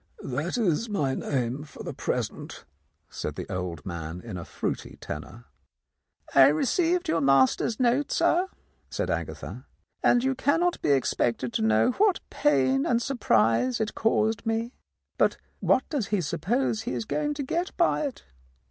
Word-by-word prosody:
"That 145 - -2
is 220 0 +1
my 145 -10 0
name 130 +1 -2
for 150 - -11
the - - -5
present," - - -4 0.4
said - - -5
the - - -6
old 90 -3 -4
man 85 -1 -5
in 110 -1 -8
a 90 - -5
fruity - - -4
tenor. 95 +11 -8 0.9
"I 135 -1 +8
received 335 - +1
your 165 - +1
master's 135 - +3
note, 255 +3 +2
sir," 340 +2 +2 0.4
said - - -2
Agatha, - - -5 0.3
"and 240 0 +4
you 265 0 +2
cannot 330 +7 +1
be - - 0
expected 125 -3 +1
to - - 0
know 110 - +3
what 395 - +2
pain 135 -2 +2
and 235 - +2
surprise 235 - +2
it 220 -1 -1
caused 220 -1 +1
me. 225 +2 -1 0.5
But - - +3 0.2
what 260 - +2
does 270 -10 -1
he 210 - +1
suppose 195 - 0
he 240 - -4
is - - -3
going 295 +5 -1
to 285 - -3
get 340 +7 -2
by 340 - +3
it? 270 - -9
205 Hz, 155 wpm, -27 LUFS, -, 0.9 s, I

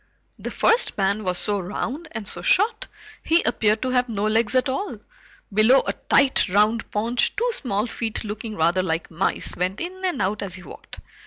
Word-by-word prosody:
The - - -5
first 475 +2 +2
man 200 +2 0
was 180 -2 -1
so 205 +1 0
round 245 - -4
and 220 -3 -5
so - - -5
short 470 -2 +2 0.3
he 330 +2 +2
appeared 220 -1 +1
to 255 - -1
have 250 -1 +1
no 210 -2 -2
legs 220 +3 +1
at 255 0 +3
all. 270 +10 -3 0.6
Below 220 +6 +5
a - - -1
tight 275 -7 +2
round 210 +4 +2
paunch, 230 +4 0
two 475 +3 0
small 230 - -1
feet 230 -2 -4
looking 215 +1 -6
rather 170 +2 +2
like 165 -2 -3
mice, 170 +4 -1
went 185 +3 -2
in 370 +2 -6
and 360 -8 -1
out 200 +2 -1
as 190 -3 -5
he 185 - -11
walked. - - -12
220 Hz, 190 wpm, -23 LUFS, 200-260 Hz, 0.6 s, Below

